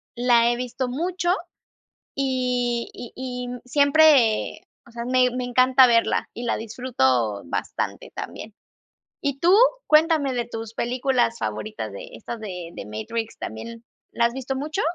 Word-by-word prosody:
la 240 Hz, -1 st, +4 dB
he 240 Hz, -, 0 dB
visto 250 Hz, +1 st, -3 dB
mucho 350 Hz, +6 st, -1 dB, 0.8 s
y 250 Hz, -3 st, 0 dB
y 240 Hz, -, -9 dB
y 250 Hz, -1 st, -5 dB, 0.2 s
siempre, 285 Hz, -5 st, +4 dB, 0.2 s
o 235 Hz, -, -17 dB
sea, 235 Hz, 0 st, -5 dB
me 255 Hz, 0 st, +4 dB
me 250 Hz, -, -2 dB
encanta 255 Hz, +1 st, +5 dB
verla 230 Hz, -1 st, +2 dB
y 240 Hz, -, -6 dB
la 235 Hz, -, 0 dB
disfruto 130 Hz, -, 0 dB
bastante -, -, -4 dB
también. 215 Hz, -1 st, -7 dB, 0.7 s
¿Y 280 Hz, -1 st, -1 dB
tú?, 350 Hz, +5 st, +4 dB, 0.3 s
cuéntame 305 Hz, -3 st, +4 dB
de 240 Hz, -1 st, -1 dB
tus 225 Hz, -1 st, -7 dB
películas 245 Hz, -1 st, 0 dB
favoritas 110 Hz, 0 st, -4 dB
de -, -, -8 dB
estas 225 Hz, -, -7 dB
de 180 Hz, -5 st, -6 dB
The -, -, -7 dB
Matrix, 215 Hz, -, -5 dB
también, 230 Hz, -, -7 dB, 0.3 s
¿la 235 Hz, -, +2 dB
has 235 Hz, -, -8 dB
visto 265 Hz, 0 st, -4 dB
mucho? 305 Hz, +8 st, -2 dB
245 Hz, 145 wpm, -24 LUFS, 225-260 Hz, 0.8 s, encanta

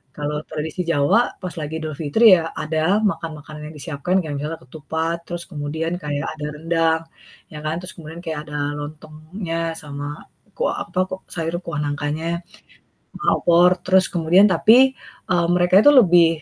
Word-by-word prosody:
Kalau 150 Hz, 0 st, -3 dB
tradisi 155 Hz, +3 st, -4 dB
Jawa 145 Hz, +3 st, +3 dB, 0.2 s
pas 180 Hz, -4 st, -5 dB
lagi 155 Hz, +1 st, -4 dB
Idul 155 Hz, -2 st, -5 dB
Fitri 185 Hz, +7 st, +6 dB
ya 165 Hz, -1 st, -4 dB
ada 160 Hz, +6 st, +1 dB
makan-makanan 155 Hz, -7 st, -3 dB
yang -, -, -14 dB
disiapkan, 150 Hz, +4 st, -3 dB
kayak 150 Hz, -3 st, -5 dB
misalnya 155 Hz, +3 st, -4 dB
ketupat, 160 Hz, +4 st, -3 dB
terus 175 Hz, -1 st, -4 dB
kemudian 160 Hz, +2 st, -3 dB
kayak 145 Hz, -1 st, -2 dB
ada 150 Hz, -, -4 dB
rendang 165 Hz, +1 st, +1 dB, 0.5 s
ya 150 Hz, -, -7 dB
kan. 155 Hz, +1 st, -1 dB
Terus 180 Hz, -, -8 dB
kemudian 165 Hz, +1 st, -9 dB
kayak 160 Hz, -2 st, -3 dB
ada 150 Hz, -, -4 dB, 0.2 s
lontongnya 155 Hz, +3 st, -5 dB
sama 145 Hz, -2 st, -7 dB, 0.5 s
kuah -, -, 0 dB
apa 185 Hz, -, -4 dB
kok 185 Hz, 0 st, -6 dB
sayur 170 Hz, +1 st, -3 dB
kuah 160 Hz, -3 st, -3 dB
nangkanya, 145 Hz, +2 st, -3 dB, 0.2 s
kuah 205 Hz, +5 st, -20 dB, 0.6 s
sama -, -, +2 dB
opor, 175 Hz, +1 st, +5 dB, 0.2 s
terus 185 Hz, 0 st, +4 dB
kemudian 175 Hz, +4 st, +5 dB
tapi, 240 Hz, +9 st, +5 dB, 0.4 s
eee, 170 Hz, -1 st, +3 dB
mereka 180 Hz, +1 st, +3 dB
itu 290 Hz, -, +8 dB
lebih 175 Hz, -, +6 dB
165 Hz, 160 wpm, -21 LUFS, 150-175 Hz, 0.6 s, itu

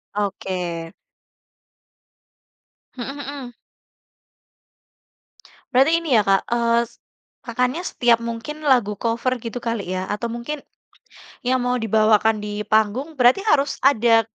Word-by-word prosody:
Oke. 180 Hz, -5 st, -3 dB, 2.1 s
Mhm 270 Hz, +3 st, -5 dB
mhm. 280 Hz, -3 st, -7 dB, 2.2 s
Berarti 270 Hz, +5 st, +4 dB
ini 290 Hz, -8 st, +2 dB
ya 210 Hz, -, +3 dB
Kak, 195 Hz, 0 st, +3 dB
eee, 235 Hz, 0 st, +2 dB
s -, -, -23 dB, 0.4 s
Kakaknya 250 Hz, +6 st, -1 dB
setiap 240 Hz, -3 st, +3 dB
mungkin 235 Hz, +6 st, -6 dB
lagu 240 Hz, -6 st, +3 dB
cover 240 Hz, +2 st, -1 dB
gitu 235 Hz, +1 st, -6 dB
kali 210 Hz, -6 st, -2 dB
ya, 185 Hz, -, -2 dB
atau 210 Hz, +3 st, -2 dB
mungkin, 235 Hz, +6 st, -5 dB, 0.9 s
yang 255 Hz, 0 st, +2 dB
mau 250 Hz, 0 st, 0 dB
dibawakan 220 Hz, -1 st, +3 dB
di 210 Hz, 0 st, -4 dB
panggung, 220 Hz, +8 st, +1 dB
berarti 260 Hz, -, +3 dB
harus 285 Hz, -8 st, +2 dB
ada 230 Hz, -4 st, +4 dB
235 Hz, 115 wpm, -22 LUFS, 215-255 Hz, 2.2 s, Berarti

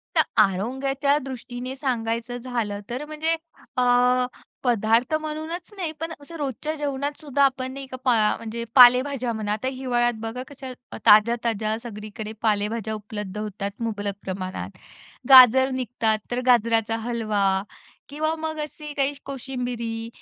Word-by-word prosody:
तर -, -, +6 dB, 0.2 s
आरोग्याच्या 265 Hz, +8 st, 0 dB
दृष्टीने 255 Hz, -1 st, -6 dB
सांगायचं 240 Hz, -2 st, -2 dB
झालं 235 Hz, -5 st, -3 dB
तर 250 Hz, +5 st, -4 dB
म्हणजे 310 Hz, +2 st, 0 dB, 0.4 s
अ, 250 Hz, 0 st, +4 dB, 0.4 s
पदार्थ 235 Hz, +2 st, +2 dB
म्हणूनच 315 Hz, +5 st, -5 dB
नाही 345 Hz, -5 st, -2 dB
पण 325 Hz, +1 st, -4 dB
असं 310 Hz, +4 st, -11 dB
रोजच्या 290 Hz, +1 st, -3 dB
जेवणात 285 Hz, -1 st, -3 dB
सुद्धा 285 Hz, -2 st, +1 dB
आपण 260 Hz, -1 st, +1 dB
नाही 275 Hz, 0 st, -7 dB
का 260 Hz, -, -7 dB
पा 250 Hz, -2 st, +5 dB, 0.2 s
म्हणजे 230 Hz, +1 st, -5 dB
पालेभाज्या 250 Hz, 0 st, +6 dB
म्हणा 215 Hz, -2 st, -3 dB
आता 220 Hz, +5 st, -3 dB
हिवाळ्यात 250 Hz, -2 st, 0 dB
बघा 225 Hz, +3 st, -4 dB
कशा 270 Hz, -2 st, -9 dB, 0.3 s
ताज्या-ताज्या 220 Hz, 0 st, +4 dB
सगळीकडे 215 Hz, -1 st, -7 dB
पालेभाज्या 220 Hz, 0 st, 0 dB
उपलब्ध 210 Hz, -2 st, -6 dB
होतात 205 Hz, -1 st, -4 dB
मुबलक 205 Hz, -3 st, -2 dB
प्रमाणात. 185 Hz, 0 st, -4 dB, 0.6 s
गाजर 260 Hz, 0 st, +9 dB
निघतात 235 Hz, -4 st, 0 dB
तर 245 Hz, +1 st, -1 dB
गाजराचा 225 Hz, -2 st, +3 dB
हलवा 210 Hz, -5 st, +1 dB, 0.5 s
किंवा 310 Hz, +3 st, -1 dB
मग 315 Hz, 0 st, -4 dB
अशी 300 Hz, 0 st, -7 dB
काही 275 Hz, 0 st, +2 dB
कोशिंबिरी 245 Hz, -4 st, -4 dB
245 Hz, 130 wpm, -24 LUFS, 220-270 Hz, 0.6 s, गाजर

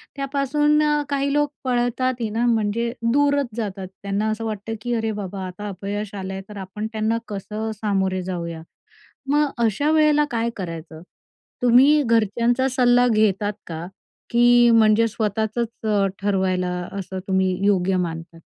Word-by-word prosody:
त्यापासून, 285 Hz, +2 st, +1 dB
अ, 295 Hz, 0 st, +2 dB
काही 280 Hz, 0 st, 0 dB
लोक 295 Hz, 0 st, +1 dB
पळतात 250 Hz, 0 st, 0 dB
ना, 230 Hz, +2 st, 0 dB
म्हणजे 230 Hz, 0 st, +1 dB, 0.2 s
दूरच 285 Hz, -1 st, +2 dB
जातात. 195 Hz, -4 st, -4 dB, 0.2 s
त्यांना 200 Hz, +2 st, -1 dB
असं 225 Hz, +1 st, -4 dB
वाटतं, 215 Hz, +1 st, -4 dB
की 240 Hz, -1 st, -2 dB
"अरे 225 Hz, -1 st, -1 dB
बाबा, 195 Hz, -2 st, -5 dB
आता 195 Hz, +3 st, -7 dB
अपयश 200 Hz, +2 st, -5 dB
आलं 190 Hz, 0 st, -5 dB
आहे, 190 Hz, -, -5 dB
तर 210 Hz, -, -9 dB
आपण 195 Hz, +3 st, -5 dB
त्यांना 220 Hz, +1 st, 0 dB
कसं 210 Hz, +2 st, -4 dB
सामोरे 190 Hz, -3 st, 0 dB
जाऊया?" 170 Hz, -3 st, -5 dB, 0.7 s
मग 295 Hz, 0 st, +3 dB, 0.2 s
अशा 285 Hz, +8 st, +1 dB
वेळेला 300 Hz, -1 st, +4 dB
काय 230 Hz, 0 st, 0 dB
करायचं? 165 Hz, -3 st, -7 dB, 0.6 s
तुम्ही 265 Hz, +5 st, +6 dB
घरच्यांचा 230 Hz, +3 st, +2 dB
सल्ला 245 Hz, -1 st, +4 dB
घेतात 210 Hz, -2 st, +2 dB
का, 165 Hz, 0 st, -5 dB, 0.4 s
की 240 Hz, 0 st, +5 dB
म्हणजे 225 Hz, 0 st, +5 dB
स्वतःचंच 220 Hz, +1 st, -1 dB, 0.2 s
अ, 200 Hz, -2 st, +3 dB, 0.2 s
ठरवायला, 190 Hz, -2 st, 0 dB, 0.3 s
असं 190 Hz, -1 st, -5 dB
तुम्ही 190 Hz, -1 st, +1 dB
योग्य 190 Hz, -2 st, +2 dB
मानतात? 165 Hz, -1 st, -4 dB
220 Hz, 140 wpm, -22 LUFS, 195-245 Hz, 0.7 s, तुम्ही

